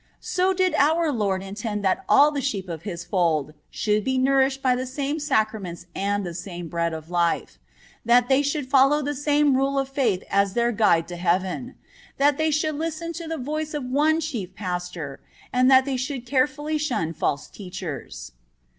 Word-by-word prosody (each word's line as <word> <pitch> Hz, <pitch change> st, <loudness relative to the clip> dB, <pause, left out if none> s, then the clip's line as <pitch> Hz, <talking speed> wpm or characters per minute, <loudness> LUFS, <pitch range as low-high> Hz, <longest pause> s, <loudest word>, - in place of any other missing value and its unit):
So 370 Hz, +1 st, +1 dB
did 370 Hz, -1 st, +1 dB
our 320 Hz, +2 st, +3 dB
Lord 200 Hz, -6 st, -1 dB
intend 210 Hz, +1 st, -4 dB
that 190 Hz, -, +1 dB
all 295 Hz, +1 st, +6 dB
the 285 Hz, -2 st, -2 dB
sheep 205 Hz, -9 st, -2 dB
of 165 Hz, -3 st, -6 dB
His 175 Hz, -2 st, -6 dB
fold 160 Hz, -6 st, 0 dB, 0.2 s
should 210 Hz, -1 st, 0 dB
be 260 Hz, +3 st, 0 dB
nourished 270 Hz, +1 st, +2 dB
by 255 Hz, -1 st, +3 dB
the 255 Hz, +1 st, -3 dB
same 280 Hz, +3 st, -2 dB
sacraments 215 Hz, -, -1 dB
and 200 Hz, 0 st, -1 dB
the 175 Hz, -, -5 dB
same 175 Hz, -1 st, -7 dB
bread 170 Hz, 0 st, -1 dB
of 160 Hz, +1 st, -8 dB
life; 170 Hz, -1 st, 0 dB, 0.4 s
that 240 Hz, +1 st, +4 dB
they 270 Hz, +1 st, +4 dB
should 285 Hz, -1 st, -2 dB
follow 275 Hz, +3 st, +4 dB
the 290 Hz, +1 st, -1 dB
same 290 Hz, 0 st, +2 dB
rule 275 Hz, +1 st, +1 dB
of 270 Hz, -1 st, +1 dB
faith 245 Hz, -9 st, 0 dB
as 200 Hz, -1 st, +2 dB
their 235 Hz, 0 st, +2 dB
guide 205 Hz, -7 st, +3 dB
to 175 Hz, -, -6 dB
heaven; 185 Hz, +8 st, -1 dB, 0.4 s
that 285 Hz, +1 st, +3 dB
they 315 Hz, 0 st, +2 dB
should 305 Hz, 0 st, 0 dB
listen 330 Hz, +1 st, -3 dB
to 335 Hz, 0 st, -6 dB
the 325 Hz, 0 st, -3 dB
voice 305 Hz, +3 st, -3 dB
of 290 Hz, -, -3 dB
one 300 Hz, +5 st, +2 dB
Chief 230 Hz, -, -4 dB
Pastor, 180 Hz, -7 st, -5 dB, 0.3 s
and 255 Hz, +1 st, +4 dB
that 260 Hz, -1 st, +6 dB
they 270 Hz, -2 st, -1 dB
should 255 Hz, -1 st, -4 dB
carefully 295 Hz, +4 st, 0 dB
shun 240 Hz, -, -1 dB
false 145 Hz, -2 st, -1 dB
teachers. 180 Hz, -, -7 dB
250 Hz, 185 wpm, -24 LUFS, 185-290 Hz, 0.4 s, all